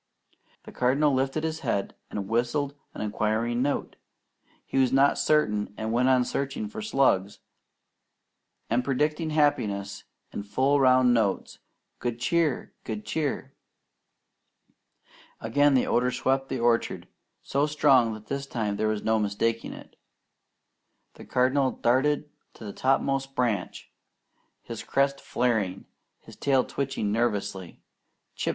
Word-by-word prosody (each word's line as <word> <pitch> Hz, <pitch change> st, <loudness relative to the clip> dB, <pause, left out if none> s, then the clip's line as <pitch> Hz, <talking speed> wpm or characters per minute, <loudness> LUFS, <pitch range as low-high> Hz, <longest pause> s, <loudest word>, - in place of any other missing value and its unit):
The -, -, -11 dB
Cardinal 140 Hz, +4 st, +2 dB
lifted 135 Hz, +4 st, 0 dB
his 160 Hz, 0 st, -2 dB
head 100 Hz, -, -2 dB, 0.2 s
and 100 Hz, -2 st, -4 dB
whistled 125 Hz, +6 st, 0 dB, 0.2 s
an -, -, -5 dB
inquiring 110 Hz, +3 st, 0 dB
note. 140 Hz, +2 st, -2 dB, 0.7 s
He 135 Hz, -, -1 dB
was 130 Hz, -2 st, +3 dB
not 135 Hz, +1 st, +4 dB
certain, 105 Hz, -10 st, +1 dB
and 110 Hz, 0 st, -3 dB
went 125 Hz, +2 st, +3 dB
on 130 Hz, -1 st, +4 dB
searching 140 Hz, -, -3 dB
for 220 Hz, 0 st, -7 dB
slugs, 130 Hz, -, +1 dB, 1.3 s
and 120 Hz, +2 st, +1 dB
predicting 150 Hz, +4 st, 0 dB
happiness 105 Hz, -10 st, 0 dB, 0.3 s
in -, -, -4 dB
full 130 Hz, +8 st, +1 dB
round 130 Hz, -2 st, +5 dB
notes: 110 Hz, -5 st, 0 dB, 0.4 s
"Good 120 Hz, -1 st, -3 dB
Cheer! 160 Hz, 0 st, 0 dB
Good 110 Hz, -2 st, -5 dB
Cheer!" 140 Hz, -3 st, -2 dB, 1.9 s
Again 145 Hz, +5 st, +3 dB
the 130 Hz, -, +3 dB
odour 125 Hz, +1 st, +2 dB
swept 135 Hz, +1 st, 0 dB
the 130 Hz, -, -2 dB
orchard, 115 Hz, 0 st, +1 dB, 0.4 s
so 140 Hz, +2 st, 0 dB
strong 135 Hz, -7 st, +3 dB
that 110 Hz, 0 st, -12 dB
this 140 Hz, 0 st, -4 dB
time 110 Hz, -5 st, -2 dB
there 110 Hz, -, 0 dB
was 110 Hz, -1 st, -1 dB
no 110 Hz, 0 st, +2 dB
mistaking 110 Hz, +2 st, -1 dB
it. -, -, -12 dB, 1.2 s
The -, -, -13 dB
Cardinal 130 Hz, +1 st, +2 dB
darted 140 Hz, +5 st, +1 dB, 0.3 s
to -, -, -12 dB
the 100 Hz, -, -6 dB
topmost 135 Hz, 0 st, 0 dB
branch, 110 Hz, -7 st, -2 dB, 0.7 s
his -, -, -6 dB
crest 140 Hz, 0 st, 0 dB
flaring, 110 Hz, -7 st, -1 dB, 0.4 s
his -, -, -14 dB
tail 135 Hz, -2 st, +2 dB
twitching 135 Hz, -7 st, -2 dB
nervously. 100 Hz, -5 st, -2 dB, 0.5 s
"Chip! -, -, -2 dB
125 Hz, 130 wpm, -27 LUFS, 110-140 Hz, 1.9 s, round